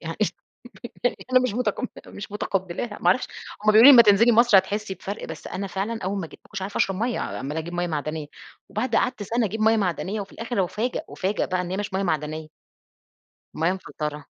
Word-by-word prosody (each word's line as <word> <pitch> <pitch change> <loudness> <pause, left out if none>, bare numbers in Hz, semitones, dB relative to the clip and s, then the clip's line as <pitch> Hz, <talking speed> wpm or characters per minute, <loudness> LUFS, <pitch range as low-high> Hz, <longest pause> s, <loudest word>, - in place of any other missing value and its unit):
يعني 165 0 -6 1.2
أنا 255 - +7
مش 255 -5 -1
متقبّلة، 250 +1 -3
مش 200 - -8
متقبلاها 195 +1 -3
ما - - 0
أعرفش 255 - +3 0.4
هم 215 - +5
بيقولوا 215 +2 +7
لي 280 - +12
أمّا 255 -4 +11
تنزلي 230 +2 +5
مصر 235 -2 +6
هتحسّي 205 +1 0
بفرق، 195 +3 -6
بس 160 -2 -8
أنا 195 +1 -4
فعلًا 200 +5 -3
أول 195 +2 -1
ما 170 - -4
جيت - - -15
ماكنتش 195 - -7
عارفة 195 +2 -4
أشرب 195 - +1
مَيّة، 235 +3 -1
عمالة 150 +4 -4
أجيب 170 +2 -6
مَيّة 175 0 -1
معدنية، 155 -1 -3 0.4
وبعد 230 +1 -1
قعدت 250 -4 +1
سنة 230 +3 0
أجيب 215 +3 -3
مَيّة 220 +1 +4
معدنية، 195 +1 -1
وفي 195 - -9
الآخر 230 -4 -1
أُفَاجَئ، 225 +7 -2
أُفَاجَئ 195 +2 -1
بقى 185 -1 0
إن 180 0 -5
هي 190 - -2
مش 205 -1 -4
مَيّة 190 +1 0
معدنية. 155 -2 -2 1.1
مَيّة 165 +3 +1
مفلترة. 150 -5 -5
195 Hz, 200 wpm, -24 LUFS, 175-220 Hz, 1.2 s, لي